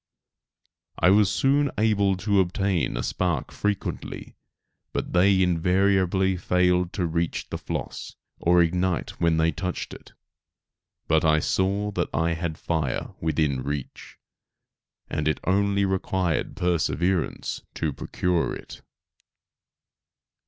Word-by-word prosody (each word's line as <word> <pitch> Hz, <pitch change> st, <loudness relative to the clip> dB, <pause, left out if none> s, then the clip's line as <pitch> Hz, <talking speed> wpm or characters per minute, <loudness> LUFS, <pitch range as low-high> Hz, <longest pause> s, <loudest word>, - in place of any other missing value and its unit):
I 90 Hz, -, +4 dB
was 100 Hz, -1 st, +5 dB
soon 140 Hz, +7 st, +2 dB
able 100 Hz, -3 st, +2 dB
to 100 Hz, +2 st, +1 dB
obtain 95 Hz, -6 st, 0 dB
a -, -, -2 dB
spark 90 Hz, -6 st, -1 dB
frequently, 105 Hz, -2 st, -4 dB, 0.6 s
but -, -, -3 dB
they 95 Hz, +1 st, +4 dB
invariably 95 Hz, +2 st, +2 dB
failed 90 Hz, 0 st, +2 dB
to 90 Hz, -, -1 dB
reach 85 Hz, 0 st, -2 dB
the -, -, -3 dB
floss, -, -, -5 dB, 0.2 s
or 90 Hz, +1 st, +4 dB
to 85 Hz, -, +5 dB
ignite 90 Hz, +1 st, -1 dB
when 85 Hz, -1 st, +3 dB
they 80 Hz, +1 st, +3 dB
touched 90 Hz, +4 st, -4 dB
it. -, -, -13 dB, 0.9 s
But 80 Hz, -1 st, +3 dB
I 80 Hz, -1 st, +4 dB
saw 100 Hz, +6 st, 0 dB
that -, -, -1 dB
I 80 Hz, +3 st, +1 dB
had 85 Hz, -1 st, -3 dB
fire 80 Hz, -6 st, -2 dB
within 75 Hz, -4 st, 0 dB
reach, 70 Hz, 0 st, -6 dB, 0.9 s
and 75 Hz, 0 st, -2 dB
it 75 Hz, -, +1 dB
only 100 Hz, +1 st, +2 dB
required 95 Hz, -3 st, -1 dB
perseverance 90 Hz, +1 st, 0 dB
to 75 Hz, -3 st, -1 dB
procure 85 Hz, +5 st, -1 dB
it. -, -, -11 dB
90 Hz, 120 wpm, -25 LUFS, 80-95 Hz, 0.9 s, was